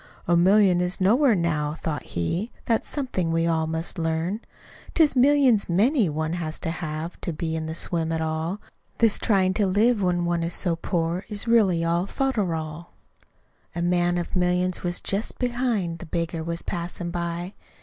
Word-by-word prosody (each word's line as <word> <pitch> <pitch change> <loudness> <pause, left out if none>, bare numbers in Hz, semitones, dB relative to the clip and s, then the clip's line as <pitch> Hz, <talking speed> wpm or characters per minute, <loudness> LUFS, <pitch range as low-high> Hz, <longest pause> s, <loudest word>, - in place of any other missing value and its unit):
"A 175 - +4
million 185 0 +5
is 180 +1 -1
nowhere, 230 +6 +4
now," 155 -4 -1
thought 150 -3 -3
he, 170 - -3
"That's 225 -2 0
somethin' 220 - -2
we 165 0 +1
all 160 -1 +1
must 160 +3 -3
learn. 165 +5 -1 0.6
"It's 310 -4 +4
millions 260 -5 +4
MANY 215 - +3
one 155 +2 -2
has 160 -3 -3
to 165 - -1
have, 160 0 -5
To 175 - -2
be 160 0 -3
in 160 0 -3
the 160 - -4
swim 165 -1 0
at 160 - -1
all. 160 +4 -2 0.4
This 225 -3 +3
tryin' 190 -3 +2
to 205 0 +1
live 210 +4 +3
when 175 -2 +1
one 170 0 0
is 165 0 -2
so 175 -3 0
poor 170 +1 -2
Is 210 +2 -2
really 195 -8 +3
all 170 +3 +1
folderol!"..... 170 - -2 0.9
A 170 - -1
man 175 0 +2
of 175 - -3
millions 180 0 +1
was 175 -1 -2
just 200 +4 -1
behind; 240 -9 -1
The 175 - -9
beggar 165 0 -2
was 170 +1 -3
passin' 175 -1 -4
by. 175 +2 -4
175 Hz, 175 wpm, -25 LUFS, 165-200 Hz, 0.9 s, million